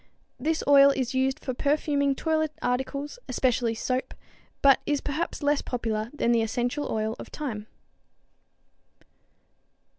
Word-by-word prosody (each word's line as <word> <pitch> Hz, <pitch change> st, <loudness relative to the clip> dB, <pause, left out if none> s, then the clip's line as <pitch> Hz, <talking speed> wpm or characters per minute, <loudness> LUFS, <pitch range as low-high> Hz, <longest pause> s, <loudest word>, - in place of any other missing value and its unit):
This 315 Hz, +5 st, 0 dB
oil 280 Hz, -1 st, +8 dB
is 265 Hz, -2 st, -1 dB
used 265 Hz, 0 st, +1 dB
for 255 Hz, -, -1 dB
perfuming 280 Hz, 0 st, +1 dB
toilet 315 Hz, 0 st, 0 dB
articles, 275 Hz, -, -2 dB
especially 245 Hz, -2 st, +1 dB
soap, 255 Hz, +3 st, -2 dB, 0.5 s
but 275 Hz, -1 st, +7 dB
is 290 Hz, -1 st, +1 dB
perhaps 300 Hz, +2 st, -3 dB
less 290 Hz, 0 st, +2 dB
popular 225 Hz, -3 st, -3 dB
than 265 Hz, -5 st, 0 dB
the 230 Hz, -1 st, +3 dB
essential 245 Hz, +6 st, -2 dB
oil 220 Hz, 0 st, -1 dB
of -, -, -8 dB
thyme. 220 Hz, -8 st, -5 dB
265 Hz, 125 wpm, -27 LUFS, 240-290 Hz, 0.5 s, oil